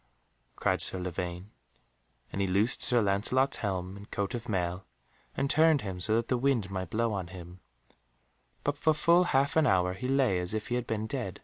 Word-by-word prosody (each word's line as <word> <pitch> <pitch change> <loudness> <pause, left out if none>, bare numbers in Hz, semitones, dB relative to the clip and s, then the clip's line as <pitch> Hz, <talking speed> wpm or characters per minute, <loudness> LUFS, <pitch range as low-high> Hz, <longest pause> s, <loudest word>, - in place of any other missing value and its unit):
cried - - 0
Sir - - +2
Lavaine, 90 +2 -5 0.8
and 100 - -2
he 100 - +1
loosed 100 +6 +2
Sir 120 -2 +3
Lancelot's 120 +7 +2
helm 95 -2 -3
and 100 +1 -12
coat 100 +4 -3
of 120 0 -5
mail, 90 -2 -2 0.5
and 140 - +1
turned 155 0 +4
him 95 -3 -5
so 110 +5 +2
that 115 0 0
the 125 - 0
wind 120 -7 0
might 95 -2 -4
blow 115 +1 0
on 95 -3 -3
him, 90 0 -11 1.0
but 145 0 -1
for 155 0 +3
full 170 +3 +4
half 140 -3 +1
an 160 -2 +4
hour 90 -2 +2
he 125 +7 -5
lay 130 -9 +2
as 90 +4 -2
if 110 - -4
he - - -2
had 125 -1 -2
been 110 -1 -2
dead. 110 -6 -4
105 Hz, 200 wpm, -29 LUFS, 95-130 Hz, 1.0 s, turned